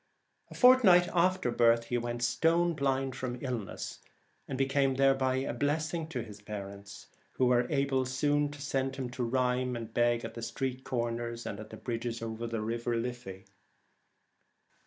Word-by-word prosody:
A - - -11
fortnight 215 -9 +6
after 180 -6 +2
birth 115 -1 +4
he 120 +1 -2
went 120 0 -3
stone 165 +8 +2
blind 135 -3 0
from 125 -2 -4
illness, 120 -6 -5 0.5
and 135 - -4
be 135 - +2
came 135 0 +1
thereby 135 -1 +3
a 130 +1 -1
blessing 155 +3 -1
to 130 -7 -4
his 105 -2 -11
parents, 100 -1 -8 0.3
who 130 - +2
were 125 -1 +4
soon 120 - -6
able 135 -2 +1
to 145 +2 0
send 135 -2 -1
him 130 -2 -4
to 125 0 -3
rhyme 125 +1 0
and 115 -1 -6
beg 120 0 +2
at 115 - -7
street 130 +2 -3
corners 120 -1 -3
and 100 - -5
at 110 0 -9
the 110 - -9
bridges 115 -1 -4
over 115 +1 -4
the 115 0 -3
Liffey. 115 -2 -3
125 Hz, 160 wpm, -31 LUFS, 115-135 Hz, 0.5 s, fortnight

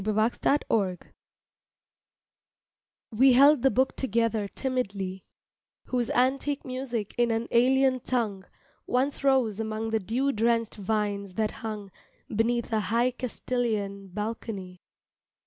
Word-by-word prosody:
TO 215 - -2
A - - +1 0.2
CASTILIAN 285 - +2
SONG 190 -5 +1 2.1
WE 255 +4 +5
held 280 +2 +6
the 270 - +5
book 260 +1 +1
together 230 -4 0
timidly, 200 -7 -3 0.6
Whose 245 -2 0
antique 275 +3 +1
music 255 -5 -4
in 240 0 +3
an 225 +1 -1
alien 260 +2 +4
tongue 225 -6 -2 0.4
Once 270 +3 0
rose 255 -7 +2
among 220 0 -3
the 220 - +2
dew 245 +8 0
drenched 230 -1 0
vines 200 -2 -2
that 215 -1 0
hung 210 -3 -5 0.4
Beneath 235 +1 0
a 220 - +3
high 230 +5 +1
Castilian 225 -5 -3
balcony. 200 -2 -5
230 Hz, 120 wpm, -27 LUFS, 210-255 Hz, 2.1 s, held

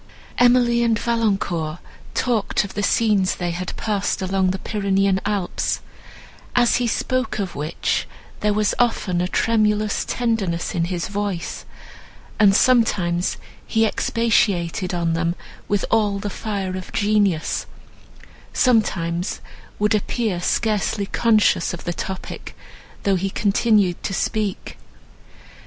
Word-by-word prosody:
Emily 245 -1 +4
and 230 -2 +2
Valancourt 195 -9 0 0.4
talked 230 -5 +1
of 200 - -8
the 205 - -2
scenes 205 -3 +2
they 175 -1 -2
had 180 +1 -5
passed 205 -2 -1
among 190 0 +1
the 190 - -1
Pyrenean 195 -1 +1
Alps; 200 -4 -1 0.8
as 240 -1 +4
he 245 0 0
spoke 255 +2 -1
of 195 -4 -3
which 150 +3 -2 0.3
there 210 - +1
was 210 0 +1
often 205 -7 +1
a 180 - 0
tremulous 215 0 +1
tenderness 215 -8 -1
in 170 -2 0
his 175 -1 -3
voice, 200 -3 -4 0.7
and 200 -2 +6
sometimes 190 -8 +2 0.3
he 225 0 +2
expatiated 200 -6 +1
on 170 -2 0
them 170 +1 0 0.3
with 205 -1 0
all 210 -3 +2
the 200 0 -4
fire 195 -3 -3
of 185 -1 -7
genius, 205 -6 +1 0.9
sometimes 180 -8 +1 0.4
would 210 +1 +2
appear 210 -3 -1
scarcely 210 0 0
conscious 215 -5 +2
of - - -11
the 175 - -2
topic, 190 +2 -6 0.5
though 200 -1 +2
he 195 +2 -1
continued 205 -2 +2
to 195 - -3
speak. 210 -3 -2
200 Hz, 125 wpm, -22 LUFS, 180-220 Hz, 0.9 s, and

